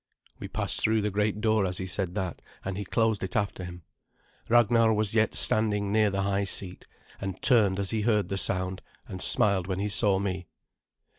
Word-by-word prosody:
We - - -7
passed - - -2
through 110 0 +2
the 105 - -1
great 105 +1 -1
door 110 -2 +1
as 90 -1 -2
he 95 - -4
said 90 -1 -4
that, 95 -4 -4 0.2
and 95 0 -4
he 100 +1 -5
closed 110 0 0
it 95 - -6
after 100 -3 -2
him. 90 -1 -10 0.7
Ragnar 115 -1 +3
was 105 -1 -2
yet 110 -1 +1
standing 105 -2 +1
near 105 0 +2
the 100 0 -2
high 100 0 -1
seat, 95 -2 -2 0.3
and 95 -2 -6
turned 105 -7 +4
as 100 -1 -1
he 110 -1 -1
heard 105 -4 0
the 95 - -3
sound, 95 0 0 0.3
and 95 - -7
smiled 95 -3 +4
when 95 -1 -3
he 100 +2 -2
saw 105 -1 +4
me. 95 -3 -4
100 Hz, 200 wpm, -27 LUFS, 95-110 Hz, 0.7 s, turned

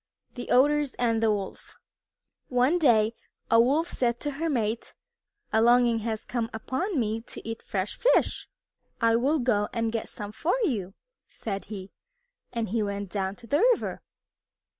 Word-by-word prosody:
XI 245 - -5
THE - - -5
OTTERS 290 +2 +3
AND 230 -2 +1
THE 225 - +3
WOLF 200 -2 -4 0.7
One 255 +7 +2
day 230 -7 +4 0.4
a 230 - +7
Wolf 290 +8 +2
said 240 -7 0
to 295 - -2
her 320 +4 -2
mate, 230 -5 -1 0.6
"A 220 - +4
longing 240 0 +5
has 220 -1 -3
come 235 -2 -2
upon 300 - -2
me 220 -1 -1
to - - -8
eat 225 0 -5
fresh 195 0 -3
fish." - - +2 0.5
"I 230 -1 +4
will 275 +7 +2
go 225 -6 +1
and 230 -1 -1
get 225 -1 -3
some 205 -1 -7
for 325 - 0
you," 205 - -1 0.3
said 200 -3 -5
he 195 -2 -8 0.6
and 230 -3 -2
he 225 +2 0
went 200 -2 -3
down 195 -1 -2
to 240 - -14
the 285 +6 +1
river. 485 +2 +2
230 Hz, 165 wpm, -27 LUFS, 215-260 Hz, 0.7 s, a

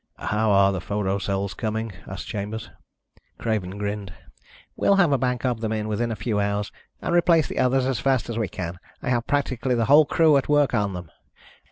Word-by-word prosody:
"How 105 +1 0
are 100 -1 +5
the 95 -3 -3
photo 100 0 -1
cells 100 -1 -2
coming?" 110 +2 -3 0.2
asked 95 - -6
Chambers. 105 +1 -5 0.7
Craven 100 -4 -2
grinned. 100 -2 -4 0.6
"We'll 200 - +3
have 175 -6 +4
a 140 - +4
bank 125 0 -1
of 120 -3 -1
them 110 -1 -2
in 110 -1 -2
within 115 +2 -1
a - - -2
few 105 +1 -1
hours, 100 0 -1 0.3
and - - -1
replace 170 -3 +4
the - - -4
others 130 0 +2
as 130 -4 0
fast 130 -4 +1
as 115 - -4
we 110 -2 -1
can. 85 -1 -6 0.2
I - - -2
have 120 -1 0
practically 130 -3 0
the 115 -1 +1
whole 150 +6 +7
crew 160 -3 +4
at 135 - -2
work 145 -2 +3
on 105 -3 0
them. 90 -3 -8
110 Hz, 205 wpm, -24 LUFS, 100-130 Hz, 0.7 s, whole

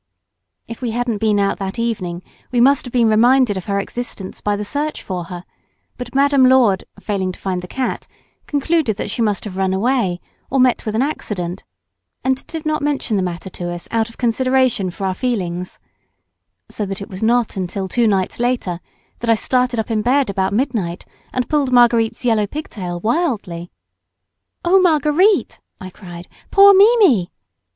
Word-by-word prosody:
If 230 - -8
we 245 - -2
hadn't 240 -3 -1
been 210 -1 +2
out 200 +1 0
that 195 +2 -4
evening 185 -7 -3 0.3
we 245 - +1
must 270 +3 +4
have - - -8
been 235 -2 +3
reminded 235 +1 +4
of 190 - -5
her 200 -1 0
existence 205 -2 -6
by 205 0 0
the 210 +1 -4
search 295 +7 -3
for 180 -3 -4
her, 175 0 -8 0.5
but 250 0 -8
Madame 280 -1 +4
Lourdes, 255 -7 +4
failing 190 -3 -2
to - - -14
find 185 -2 -2
the 180 - -9
cat, 255 +6 -3 0.4
concluded 290 -6 0
that - - -4
she 230 - -3
must 210 -3 0
have 190 -3 -7
run 190 -1 +1
away 205 -4 0 0.3
or 270 - 0
met 250 -3 +2
with 215 - -2
an 235 - +2
accident, 190 - -4 0.6
and 265 0 -1
did 320 -2 -6
not 310 -1 0
mention 285 -6 -1
the 195 - +1
matter 180 0 -4
to 175 0 -5
us 175 0 -6
out 225 0 0
of 230 - -17
consideration 250 -3 +1
for 195 +3 -5
our 190 - 0
feelings, 185 -6 -3 0.9
so 215 - -4
that 195 -1 -4
it 200 - -7
was 185 -1 -8
not 235 +1 +2 0.2
till 190 +2 -4
two 235 +4 +1
nights 195 -1 0
later 240 -8 -1 0.4
that 235 - -3
I 230 - +6
started 250 +1 +1
up 220 - -3
in 215 -1 +1
bed 255 +1 +2
about 190 -1 -1
midnight 205 -7 -2 0.3
and 255 -1 -2
pulled 290 -4 0
Marguerite's 240 -1 +3
yellow 220 -3 +2
pigtail 190 - -6
wildly. 215 - -1 1.0
"Oh, 375 +3 +5
Marguerite," 345 +3 +3 0.2
I 185 0 -8
cried, 175 -2 -11 0.2
"poor 400 0 +7
Mimi!" 390 - +5
225 Hz, 180 wpm, -19 LUFS, 190-260 Hz, 1.0 s, poor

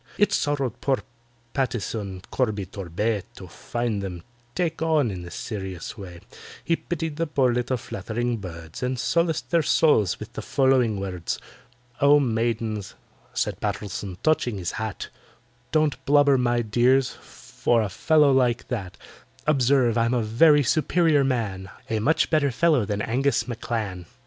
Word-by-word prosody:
It 205 - +3
sorrowed 140 -5 -1
poor 135 -2 0 0.5
PATTISON 105 -7 -3
CORBY 110 -6 0
TORBAY 100 +3 -2
To - - -10
find 120 -4 -3
them 90 -3 -6 0.3
"take 165 -3 -1
on" 155 -7 +2
in 90 -2 -6
this 85 -1 -9
serious 95 -6 -5
way; 90 -6 -10 0.4
He 170 - +2
pitied 160 -3 -4
the 165 0 0
poor 135 -4 +2
little 125 +1 0
fluttering 115 +3 -3
birds, 85 -5 -9
And 125 0 -1
solaced 170 +5 0
their 170 -1 +4
souls 140 - +3
with - - -9
the - - -5
following 130 -6 +2
words: 90 -3 -3 0.6
"Oh, 145 +1 +6
maidens," 115 -4 -1 0.4
said - - -1
PATTISON, 100 -2 -4
touching 125 -8 +1
his 90 -3 -3
hat, - - -5 0.6
"Don't 155 -3 +1
blubber, 145 -1 +5
my 120 -2 +1
dears, 125 +4 +3
for 115 -2 -2
a - - -1
fellow 150 - +3
like 125 -3 +1
that; 100 -7 -4 0.5
Observe, 130 -5 +3
I'm 115 +2 +2
a 120 - +1
very 145 +7 +5
superior 155 +2 +3
man, 105 -8 -2 0.2
A 110 - +1
much 150 +10 +2
better 155 -3 +3
fellow 145 -2 +2
than 105 0 -2
ANGUS 125 0 +1
M'CLAN." 110 -7 -4
120 Hz, 145 wpm, -25 LUFS, 105-140 Hz, 0.6 s, Oh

